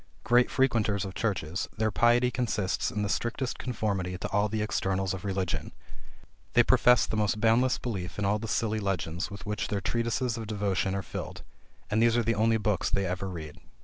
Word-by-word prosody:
Great 120 +1 +4
frequenters 110 -7 +1
of 95 - -6
churches, 95 -6 -2
their 110 0 +1
piety 120 +3 +3
consists 110 -6 -1
in 105 - -2
the - - 0
strictest 120 +5 -2
conformity 100 -7 -2
to - - -4
all 105 +1 +2
the 110 0 -1
externals 95 -2 -1
of 95 - -6
religion. 95 -3 -2 0.8
They - - +6
profess 125 -2 +5
the - - -3
most 105 0 +1
boundless 115 +4 +3
belief 95 -7 -5
in 105 - -1
all 105 +2 +2
the 115 - -5
silly 110 0 0
legends 90 -3 -2
with 100 -1 -9
which 105 0 -2
their 100 - -1
treatises 115 +3 -1
of 110 -2 -5
devotion 100 -2 -1
are 100 - -2
filled; - - -7 0.5
and 110 +2 +2
these 115 0 +4
are 120 - +2
the 115 +1 +1
only 115 +1 +2
books 105 -3 0
they 100 0 0
ever 95 +1 -3
read. 80 -4 -8
105 Hz, 195 wpm, -28 LUFS, 95-115 Hz, 0.8 s, They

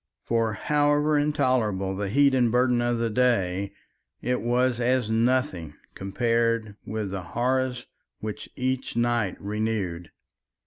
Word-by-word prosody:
For 115 -1 0
however 145 +3 +2
intolerable 120 -10 +1
the 100 0 -3
heat 140 +5 +4
and 125 -3 +3
burden 125 0 +3
of 120 0 +1
the 115 -1 -1
day, 100 -5 +1 0.5
it 125 +1 -1
was 125 +1 +1
as 125 -2 +1
nothing 110 - 0 0.2
compared 115 +1 0
with 105 -2 -3
the 95 -1 -3 0.2
horrors 125 0 0 0.3
which 105 -1 -6
each 130 0 -2
night 120 -5 0
renewed. 100 -5 -3
120 Hz, 125 wpm, -26 LUFS, 105-125 Hz, 0.5 s, heat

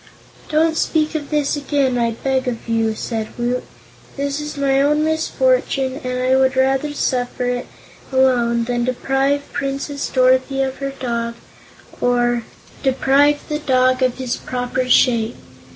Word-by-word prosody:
"Don't 320 +1 +2
speak 310 -1 +1
of 300 -2 -4
this 295 -2 +1
again, 280 -3 0
I 235 -1 +2
beg 260 +3 -1
of 235 -2 -4
you," 225 -1 +1
said 220 -1 -3
Woot. 245 +1 -1 0.6
"This 280 +1 -2
is 300 -1 -6
my 275 -1 +2
own 300 +2 +2
misfortune 315 - 0
and 250 0 -2
I 260 +1 +3
would 265 0 +3
rather 270 +2 +1
suffer 250 -3 -1
it 245 0 -2 0.4
alone 245 -3 +3
than 240 0 -1
deprive 270 +3 0
Princess 280 0 -3
Dorothy 260 +1 +2
of 265 0 -3
her 275 0 -3
dog, 235 -2 -2 0.7
or 240 -1 +2 0.4
deprive 275 +2 +2
the 300 0 -2
dog 255 -3 +2
of 255 -1 +1
his 255 -2 -2
proper 250 0 -3
shape. 235 -2 +3
260 Hz, 145 wpm, -19 LUFS, 245-280 Hz, 0.7 s, I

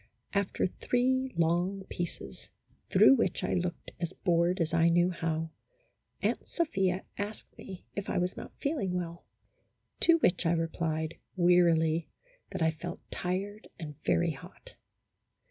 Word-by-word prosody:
After 200 -1 +1
three 260 +6 +1
long 175 +4 +1
pieces, 175 -2 -6 0.4
through - - +7
which 190 -6 0
I - - 0
looked 180 -1 -2
as 170 -2 -3
bored 175 +1 +2
as 165 -1 0
I 165 0 +5
knew 175 +2 +4
how, 165 -1 -2 0.7
Aunt - - 0
Sophia 190 - 0 0.2
asked 205 +1 -5
me 190 -2 -10
if 200 - -4
I - - 0
was 180 +1 0
not - - -9
feeling 275 - -1
well. 170 -1 -4 0.7
To 335 -1 +6
which 180 - +2
I 165 - +3
replied, 165 -1 -2 0.2
wearily, 170 -2 +4 0.4
that 190 -4 -2
I 160 - +4
felt 170 +2 -7
tired 195 +4 -3
and 155 -3 -6
very 170 -1 +2
hot. 135 - -12
175 Hz, 140 wpm, -30 LUFS, 165-195 Hz, 0.7 s, through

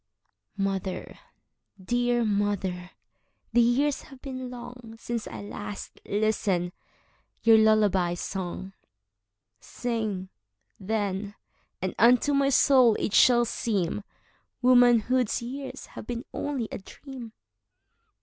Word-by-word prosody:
Mother, 195 -1 -3 0.6
dear 240 +4 +1
mother, 200 -4 -1 0.6
the 240 - +5
years 270 +5 +2
have 270 -2 -13
been 260 -2 -6
longSince 240 -2 -7
I - - -7
last 205 0 -7
listened 200 -4 0 0.7
your 225 -1 +7
lullaby 205 -5 +3
song:Sing, 185 - -6 0.5
then, 205 0 -2 0.5
and 185 - -1
unto 245 +6 +5
my 275 0 +3
soul 255 -4 +5
it 210 - -2
shall 240 -2 +6
seemWomanhood's 240 +4 +1
years 270 +3 -6
have - - -11
been 240 +1 -4
only 275 -6 -2
a - - -5
dream. 240 +3 -10
220 Hz, 90 wpm, -27 LUFS, 195-245 Hz, 0.7 s, your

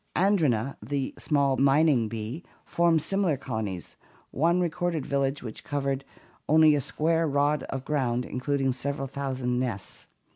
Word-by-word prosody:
Andrena, 150 - +2
the 140 -2 -3
small 140 -3 +1
mining 140 -3 +4
bee, 115 - -5 0.2
forms 170 -2 +2
similar 195 -7 +1
colonies; 110 -9 -5 0.3
one 170 +5 +2
re 180 - +2
corded 170 -3 -2
village 140 0 -1
which 110 -3 -7
covered 140 -2 -2 0.5
only 155 0 +6
a 145 - +1
square 165 +4 0
rod 145 +1 +1
of 135 -1 -4
ground 125 -5 0
including 135 0 -1
several 135 +2 -3
thousand 130 -2 -2
nests. 115 -7 -5
140 Hz, 140 wpm, -27 LUFS, 130-155 Hz, 0.5 s, only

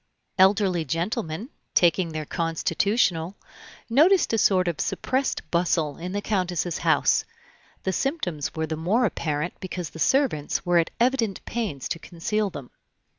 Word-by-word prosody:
Elderly 190 -3 +4
gentlemen, 170 - -3 0.3
taking 175 -1 +3
their 155 -1 -4
constitutional, 165 +3 0 0.5
noticed 310 +7 +4
a - - +3
sort 185 -3 +3
of 170 -3 -1
suppressed 260 +1 -1
bustle 165 -4 +1
in 180 +2 -5
the 205 +1 -3
Countess's 180 -4 -1
house; - - +3 0.6
the 190 - -1
symptoms 185 - -2
were 160 0 -1
the 160 0 -3
more 195 +10 +1
apparent 155 -4 -2
because 180 -5 -5
the 160 - -10
servants 255 - +1
were 175 -1 +4
at 165 - +1
evident 235 -5 +1
pains 210 - -3
to 165 - -3
conceal 200 +6 -2
them. 140 -8 -9
180 Hz, 140 wpm, -25 LUFS, 165-215 Hz, 0.6 s, Elderly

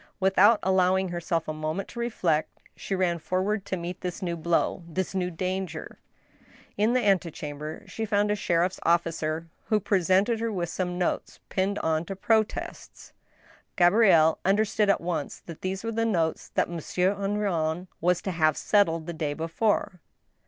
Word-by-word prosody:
Without 195 +3 +5
allowing 190 0 +2
herself 170 -1 -2
a 155 - -2
moment 155 +5 -3
to 235 - -8
reflect, 180 -10 0 0.2
she 195 - -3
ran 175 -2 +1
forward 190 +5 -1
to 190 - -2
meet 175 +1 -6
this 180 0 -4
new 170 -2 -1
blow 170 +2 0
— - - -17
this 185 +3 -2
new 180 -2 -1
danger. 185 -1 -4 0.8
In 215 +3 +2
the 250 -3 +1
antechamber 155 -4 -1
she 205 +3 -5
found 205 0 +1
a - - +2
sheriff's 180 -1 0
officer, 165 -1 0 0.2
who 215 -2 +2
presented 195 +3 +2
her 230 0 -1
with 175 -4 -2
some 180 0 -3
notes 180 - -2
pinned 195 +2 0
on 160 0 0
to 195 - -5
protests. 215 +2 -2 0.6
Gabrielle 175 -4 +5
understood 205 +1 +2
at 200 - +3
once 165 -4 -3
that 165 -2 -9
these 190 +2 -3
were 230 - -2
the 230 0 0
notes 170 -8 0
that - - +2
Monsieur 180 +3 0
Henrion 195 -5 -1 0.2
was 180 +1 +2
to 190 - -2
have 155 -3 +2
settled 165 -6 +2
the 170 - -5
day 155 -3 -2
before. 180 +3 -1
185 Hz, 165 wpm, -27 LUFS, 165-200 Hz, 0.8 s, Without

